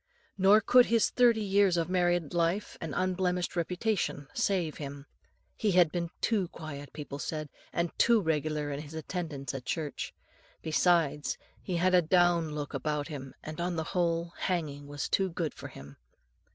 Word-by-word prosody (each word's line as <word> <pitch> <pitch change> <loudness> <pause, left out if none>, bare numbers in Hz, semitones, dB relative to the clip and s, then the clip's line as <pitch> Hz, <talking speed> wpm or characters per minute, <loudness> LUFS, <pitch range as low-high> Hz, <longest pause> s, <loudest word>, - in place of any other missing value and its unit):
Nor 195 +3 +6
could 250 +3 +6
his 230 -1 +3
thirty 235 -3 +4
years 195 -2 +3
of 165 - +1
married 175 -3 +1
life 175 +4 0
and 165 -3 -4
unblemished 180 -1 0
reputation 175 -4 -1
save 185 -8 0
him. 140 -1 -7 0.5
He 210 -3 +1
had 175 -3 +5
been 170 -1 -2
too 205 -6 +1
quiet, 145 -4 -8
people 145 -2 -7
said, 155 0 -4 0.2
and 170 0 -1
too 235 -1 +5
regular 155 -4 -1
in 140 - -3
his 155 +1 -10
attendance 160 -5 -4
at 135 -2 -5
church; 155 -1 -3 0.5
besides, 160 -2 +2 0.2
he 185 - -3
had 185 +2 +2
a 180 - +7
down 170 -2 +3
look 145 -1 -4
about 150 +2 -2
him, 135 -3 -7
and, 155 +2 -6
on 175 0 -1
the 160 - -1
whole, 170 -1 0
hanging 150 -6 -2
was 145 -1 -4
too 195 -1 +1
good 165 -3 -3
for - - -8
him. 70 +1 -12
170 Hz, 165 wpm, -30 LUFS, 150-185 Hz, 0.5 s, a